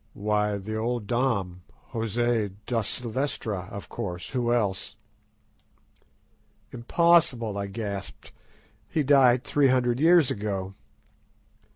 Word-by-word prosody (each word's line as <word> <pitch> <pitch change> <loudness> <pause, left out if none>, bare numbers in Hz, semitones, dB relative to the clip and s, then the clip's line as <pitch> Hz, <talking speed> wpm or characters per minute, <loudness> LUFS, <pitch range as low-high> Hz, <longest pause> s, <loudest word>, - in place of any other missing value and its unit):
"Why, 105 0 0
the 110 +3 -5
old 115 0 -2
Dom, 100 -7 -1 0.3
José 115 -2 0
da 115 -1 0
Silvestra, 110 -4 -3
of 100 - -8
course—who 110 +7 -3
else?" 105 -6 -1 1.8
"Impossible," 125 - +2
I 100 0 -3
gasped; 100 -6 -6 0.6
"he 155 - 0
died 130 -3 +5
three 145 -2 +2
hundred 125 -1 +2
years 165 -2 +5
ago." 100 -2 -3
115 Hz, 95 wpm, -26 LUFS, 100-125 Hz, 1.8 s, died